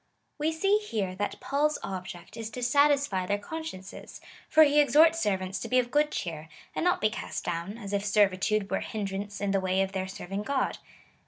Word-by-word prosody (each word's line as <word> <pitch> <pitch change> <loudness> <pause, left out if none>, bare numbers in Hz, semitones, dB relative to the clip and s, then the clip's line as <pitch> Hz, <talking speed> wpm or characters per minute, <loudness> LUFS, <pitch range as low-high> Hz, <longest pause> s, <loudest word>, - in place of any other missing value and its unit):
We 305 +2 +1
see 390 +6 +2
here 215 - -3
that 205 +1 -3
Paul's 295 +2 +1
object^ 180 -2 -7
is 225 -1 -5
to 250 +1 -6
satisfy 280 -7 +3
their 205 - +1
consciences; 205 -5 -8 0.3
for 315 0 +7
he 295 0 +4
exhorts 320 +3 +5
servants 190 -2 -1
to - - -5
be 255 - +2
of 245 -1 +1
good 295 +1 +3
cheer, 165 - -5 0.3
and - - -1
not 355 0 +2
be 215 - +3
cast 230 - -5
down, 175 +5 -3
as 205 -3 -7
if 200 0 0
servitude 205 0 +2
were - - +2
a - - -4
hinderance 200 -1 -4
in 200 -1 -1
the 195 -1 +1
way 185 0 0
of 190 - -4
their 190 -1 -3
serving 195 +1 -5
God. 265 +4 -1
205 Hz, 200 wpm, -28 LUFS, 190-285 Hz, 0.3 s, for